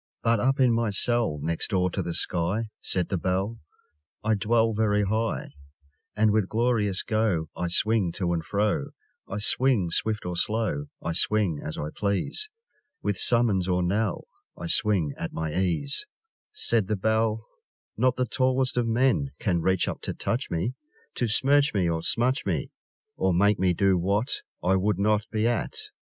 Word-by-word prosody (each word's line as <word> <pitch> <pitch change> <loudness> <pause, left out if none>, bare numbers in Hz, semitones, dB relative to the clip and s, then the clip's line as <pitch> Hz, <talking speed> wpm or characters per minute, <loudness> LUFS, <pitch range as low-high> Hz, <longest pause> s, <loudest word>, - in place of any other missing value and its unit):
But 115 -1 +2
up 135 +5 +1
in 125 -3 +4
my 115 -1 0
cell 115 -4 +2
Next 80 +1 +1
door 90 -2 0
to - - -2
the 85 - -3
sky, 95 +6 0
Said 90 -2 +1
the 95 - -1
Bell, 95 +6 -2 0.6
I 110 0 +1
dwell 115 +2 +1
Very 105 -1 +1
high; 110 -2 -2 0.6
And 110 0 +3
with 105 -3 0
glorious 110 -4 +1
go 105 -8 -1
I 90 - -3
swing 100 +1 +2
to 90 -3 -1
and 85 -1 -2
fro; 105 - -1 0.4
I 100 - -5
swing 105 -4 +4
swift 110 +2 -1
or 90 0 -4
slow, 100 -6 -1 0.2
I 85 - -2
swing 95 -3 +1
as 75 - -6
I 75 - -4
please, 100 - -1 0.5
With 105 - 0
summons 105 -4 +3
or 90 -1 0
knell; 100 +2 -1 0.3
I - - -7
swing 85 -4 +3
at - - -5
my 80 -1 -3
ease, 95 - +1 0.4
Said 115 - +2
the 105 - 0
Bell: 110 +2 0 0.5
Not 125 +2 +1
the 125 - 0
tallest 130 +2 0
of 120 -1 +1
men 130 +4 +1
Can 90 -6 0
reach 95 +1 +1
up - - -5
to - - -3
touch 120 +4 -2
me, 85 +9 -2 0.4
To 120 - -1
smirch 140 +4 +3
me 95 -3 +1
or 80 -1 -1
smutch 125 - +2
me, 85 -7 -3 0.5
Or 95 -2 +1
make 100 +3 +3
me 90 -2 +2
do 95 -1 +2
what 100 +7 -1 0.2
I 95 +2 +2
would 100 0 0
not 105 +1 +1
be 110 0 -1
at! 120 - -2
105 Hz, 175 wpm, -26 LUFS, 90-115 Hz, 0.6 s, in